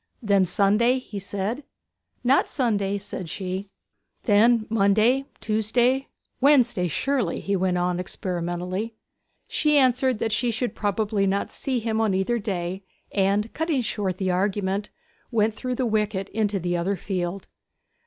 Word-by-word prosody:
'Then 200 -3 +4
Sunday?' 210 +7 +3
he 220 -5 -6
said. 200 +7 -3 0.6
'Not 255 +3 +3
Sunday,' 205 -7 0
said 190 -3 -6
she. 190 +2 -4 0.5
'Then 225 +1 +4
Monday 220 +5 +3
Tuesday 240 +5 +1 0.3
Wednesday, 250 -9 +4
surely?' 245 - 0
he 200 - -1
went 185 -1 +1
on 180 0 0
experimentally. 180 +4 -3 0.5
She 300 -1 +2
answered 255 -2 +3
that 225 +1 -1
she 240 +3 +1
should 235 -1 -2
probably 205 0 0
not 195 +1 -1
see 260 -2 -2
him 225 -1 -1
on 210 -4 +2
either 210 +5 +1
day, 190 -3 -3 0.3
and, 200 +2 +1
cutting 320 -4 0
short 200 -5 -2
the 185 -1 0
argument, 195 +2 0 0.4
went 220 -2 +2
through 250 +3 -3
the 255 - 0
wicket 210 -3 0
into 210 -2 0
the 175 -1 -1
other 180 +4 0
field. 185 0 -3
205 Hz, 140 wpm, -25 LUFS, 190-235 Hz, 0.6 s, Then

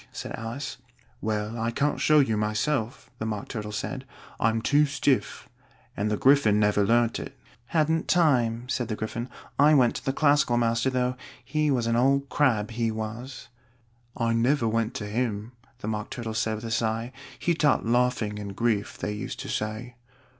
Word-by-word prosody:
said - - -6
Alice. 120 +5 -5 0.4
"Well, 110 +1 -2
I 115 +1 0
can't 140 +5 0
show 155 -1 +5
it 135 - +1
you, 110 - +1
myself," 110 +4 -1
the 110 - -3
Mock 105 -2 -4
Turtle 105 -3 -5
said: 130 +5 -4 0.4
"I'm 115 0 +2
too 145 +6 +3
stiff. 140 -1 0 0.5
And 105 +2 -1
the 105 - 0
Gryphon 130 -6 +4
never 105 -1 +3
learnt 115 +2 +2
it." - - -8 0.3
"Hadn't 160 +1 +1
time," 125 -8 +2
said 125 -3 -1
the 110 - -2
Gryphon: 115 +3 -4 0.3
"I 150 +2 +6
went 125 -4 +4
to - - -8
the 135 - +2
Classical 145 -4 +3
master, 115 +2 +2
though. 125 -1 0 0.3
He 155 -1 0
was 125 -4 +1
an 115 0 +1
old 140 +2 +2
crab, 115 -7 +2
he 115 0 0
was." 115 +4 -6 0.7
"I 115 -1 +1
never 120 +2 +2
went 115 0 0
to 105 - -4
him," 110 0 -2 0.3
the - - -5
Mock 105 -1 -3
Turtle 115 -2 -5
said 110 0 0
with 110 +2 -7
a 115 - -4
sigh: 115 +1 -1 0.3
"he 175 - +1
taught 150 -6 +2
Laughing 120 -3 +1
and 100 -1 -6
Grief, 110 -2 0
they - - -3
used 105 - -5
to - - -7
say." 110 +3 -4
115 Hz, 180 wpm, -26 LUFS, 110-135 Hz, 0.7 s, I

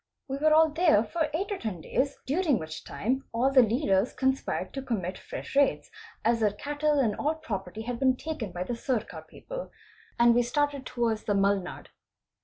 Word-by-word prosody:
We 270 0 -3
were 310 +2 +3
all 315 +1 +6
there 310 - +4
for 310 +7 -1
eight 375 +7 -2
or 400 - -2
ten 205 -6 -4
days, 275 - -1
during 300 -2 +2
which 160 -2 -7
time 265 +5 -2
all 250 +4 +2
the 265 -1 +7
leaders 225 -2 +2
conspired 265 0 -1
to 270 - -4
commit 195 -8 -3
fresh 485 - -8
raids 280 -1 +2 0.3
as 230 0 +3
their 215 -2 +3
cattle 295 +6 0
and 230 -7 +2
all 305 +2 0
property 215 - -5
had 240 0 -4
been 260 -1 +3
taken 265 - -5
by 175 +1 -3
the 240 +6 -3
Sircar 235 -2 -3
people - - -8 0.5
and 235 0 +6
we 240 - +4
started 280 +2 -1
towards 230 -3 -1
the 205 - +1
Mulnad. 195 -2 0
255 Hz, 190 wpm, -28 LUFS, 215-295 Hz, 0.5 s, the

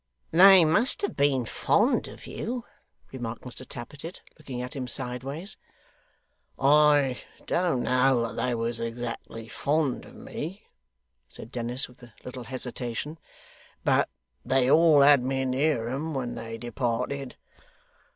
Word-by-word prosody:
'They 185 +1 +8
must 220 - +2
have 405 - -1
been 140 -4 +2
fond - - +2
of - - -11
you,' 240 +1 -4 0.5
remarked 120 -3 -6
Mr 125 - -8
Tappertit, 145 +8 -8 0.2
looking 135 -5 -6
at 125 +2 -5
him 130 -2 -4
sideways. 135 - -5 1.0
'I 145 -2 +4 0.2
don't 170 -8 +1
know 130 0 +3
that 115 - -5
they 120 +1 0
was 115 0 -2
exactly 115 -1 -5
fond 145 +2 0
of - - -14
me,' 180 +7 -7 0.7
said 115 - -11
Dennis, 120 +1 -3
with 125 0 -20
a 120 -2 -14
little 125 -1 -7
hesitation, 130 +4 -5 0.6
'but - - +3 0.3
they 130 0 +2
all 160 -2 +6
had 140 -1 +7
me 135 +1 -1
near 130 -2 +1
'em 145 +4 -3
when 125 -3 -2
they 115 0 -6
departed. 120 +3 -3
130 Hz, 130 wpm, -27 LUFS, 120-150 Hz, 1.0 s, They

